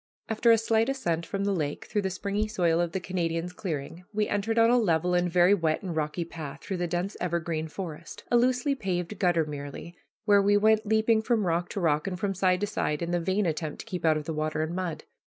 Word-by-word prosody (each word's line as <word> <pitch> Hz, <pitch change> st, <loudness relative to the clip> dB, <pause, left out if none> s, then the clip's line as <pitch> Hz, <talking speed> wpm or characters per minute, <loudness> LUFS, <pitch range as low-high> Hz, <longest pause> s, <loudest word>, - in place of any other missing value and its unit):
After 225 Hz, +1 st, +2 dB
a 230 Hz, -, +7 dB
slight 225 Hz, +2 st, +2 dB
ascent 170 Hz, -12 st, -1 dB
from 195 Hz, 0 st, -2 dB
the 200 Hz, 0 st, +1 dB
lake 150 Hz, -5 st, -3 dB
through 210 Hz, -, -1 dB
the 190 Hz, -, -1 dB
springy 200 Hz, +3 st, -2 dB
soil 175 Hz, -5 st, +1 dB
of 170 Hz, -1 st, -1 dB
the 190 Hz, -, -2 dB
Canadian's 175 Hz, -1 st, -2 dB
clearing, 165 Hz, -2 st, -5 dB
we 210 Hz, 0 st, 0 dB
entered 215 Hz, +3 st, -1 dB
on 230 Hz, +1 st, +6 dB
a 250 Hz, -, +5 dB
level 175 Hz, -4 st, +1 dB
and 175 Hz, 0 st, +2 dB
very 180 Hz, +2 st, +5 dB
wet 165 Hz, -2 st, 0 dB
and 180 Hz, -4 st, -4 dB
rocky 155 Hz, +2 st, -2 dB
path 155 Hz, -4 st, -8 dB
through 190 Hz, -, -3 dB
the 175 Hz, 0 st, -1 dB
dense 175 Hz, +4 st, -2 dB
evergreen 165 Hz, -2 st, -1 dB
forest, 160 Hz, -1 st, -7 dB
a -, -, +4 dB
loosely 250 Hz, +3 st, +3 dB
paved 190 Hz, -5 st, -3 dB
gutter 175 Hz, -4 st, +2 dB
merely, 145 Hz, +3 st, -7 dB, 0.3 s
where 205 Hz, -1 st, +5 dB
we 205 Hz, +1 st, +4 dB
went 215 Hz, +1 st, +3 dB
leaping 220 Hz, +1 st, +3 dB
from 220 Hz, -2 st, +1 dB
rock 175 Hz, 0 st, 0 dB
to -, -, -4 dB
rock 155 Hz, -1 st, +1 dB
and 180 Hz, -2 st, -4 dB
from 200 Hz, -1 st, -1 dB
side 185 Hz, -1 st, +2 dB
to -, -, +2 dB
side 150 Hz, -5 st, -2 dB
in 170 Hz, -, -3 dB
the 175 Hz, -, +1 dB
vain 190 Hz, +4 st, 0 dB
attempt 155 Hz, -2 st, -2 dB
to -, -, -13 dB
keep 185 Hz, -6 st, -5 dB
out 160 Hz, -1 st, +4 dB
of 150 Hz, -, -5 dB
the 160 Hz, -, -3 dB
water 155 Hz, 0 st, -1 dB
and 160 Hz, +2 st, -4 dB
mud. 180 Hz, -3 st, -3 dB
180 Hz, 240 wpm, -28 LUFS, 165-205 Hz, 0.3 s, a